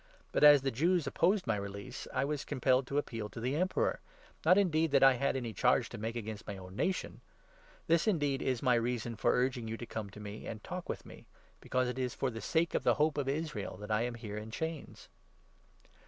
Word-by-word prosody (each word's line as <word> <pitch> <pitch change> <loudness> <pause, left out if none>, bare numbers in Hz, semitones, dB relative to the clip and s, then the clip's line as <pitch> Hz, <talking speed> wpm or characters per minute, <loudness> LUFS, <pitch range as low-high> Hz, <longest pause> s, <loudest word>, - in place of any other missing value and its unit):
But, - - +1
as 145 -2 +9
the 135 - 0
Jews 170 +6 +2
opposed 180 +7 +2
my 115 - +1
release, 100 0 -6
I 130 +1 0
was 145 0 -2
com 145 - -5
pelled 130 0 +3
to 140 - -2
appeal 115 -7 -2
to - - -8
the 125 +4 -1
Emperor 185 +4 +1 0.2
— - - -25
not, 180 +3 +7
indeed, 165 -5 +3
that 135 -1 +5
I 135 0 +8
had 135 +2 0
any 120 -4 -3
charge - - +2
to - - -8
make 110 +2 -3
against 110 -2 -6
my 100 - -5
own 95 0 -10
nation. 185 - -2 0.6
This, 165 0 +3
then, 205 -7 +2
is 135 -3 0
my 125 -2 +4
reason 120 0 -1
for 105 - +2
urging 125 -2 0
you 115 +1 -4
to 120 - -6
come 110 -3 -5
to 100 - -12
see - - -9
me 105 +1 -7
and 110 -1 -6
talk 180 -1 -6
with - - -4
me; - - -13 0.3
because 130 0 0
it 125 +1 -3
is 125 -2 -2
for 135 - -1
the 115 -1 -6
sake 165 +8 +1
of - - +1
the - - +4
Hope 150 0 +2
of 135 -1 -1
Israel 145 - -3
that 105 +2 -7
I 110 +1 +2
am 120 0 -2
here 105 -3 -6
in 105 +1 -6
chains." 160 +6 -5
130 Hz, 240 wpm, -33 LUFS, 110-150 Hz, 0.6 s, as